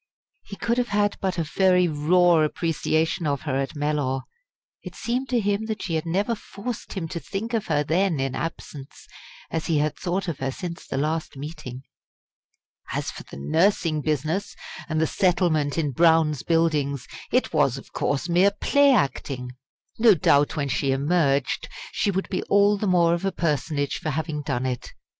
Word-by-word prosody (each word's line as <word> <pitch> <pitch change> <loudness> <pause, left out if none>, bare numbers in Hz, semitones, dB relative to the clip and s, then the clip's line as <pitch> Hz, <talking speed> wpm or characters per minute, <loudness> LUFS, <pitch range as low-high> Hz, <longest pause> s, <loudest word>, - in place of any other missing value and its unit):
He 200 - -9
could 235 +4 0
have 245 - 0
had 205 -1 +1
but 190 -1 -1
a 165 - +1
very 180 +3 +3
raw 170 +3 +4
appreciation 160 +1 0
of 140 -2 -1
her 145 -4 -2
at 135 +3 -3
Mellor. 145 -3 -1 0.6
It - - -9
seemed 250 +3 -2
to 245 -2 +2
him 205 +1 0
that 220 -1 -4
she 170 - -3
had 160 +1 -1
never 200 +7 0
forced 225 +1 -7
him 180 -5 -3
to 170 - -4
think 220 +7 -5
of 225 -3 -1
her 145 - +1
then 170 +1 +1
in 135 -1 -1
absence, 145 -2 -6 0.5
as 165 -1 -2
he 165 - +2
had 150 0 0
thought 185 +2 -2
of 165 -5 -3
her 135 - -1
since 170 +5 -6
the - - -3
last 155 +1 -2
meeting. 140 -3 -7 1.1
As - - -2
for - - -9
the - - -11
nursing 160 - +1
business, 155 +6 -1 0.3
and 155 -1 0
the 160 - +3
settlement 170 -6 +1
in 150 -4 0
Brown's 160 -1 +3
Buildings, 150 -5 +1 0.3
it - - +1
was, - - +2
of - - -12
course, 145 +4 -1
mere 180 +3 +4
play 280 +7 +3
acting. 130 - -1 0.5
No 220 -3 +7
doubt 145 -2 +3
when 140 -3 -1
she 135 +2 0
emerged 140 -1 +1 0.2
she - - 0
would 190 0 -1
be 185 - -1
all 205 +1 +4
the 205 +1 -2
more 170 -2 +4
of 170 +2 -2
a 195 - +1
personage 150 -4 -1
for 155 - -3
having 155 0 -2
done 135 -3 -2
it. 125 -2 -4
165 Hz, 180 wpm, -24 LUFS, 145-190 Hz, 1.1 s, No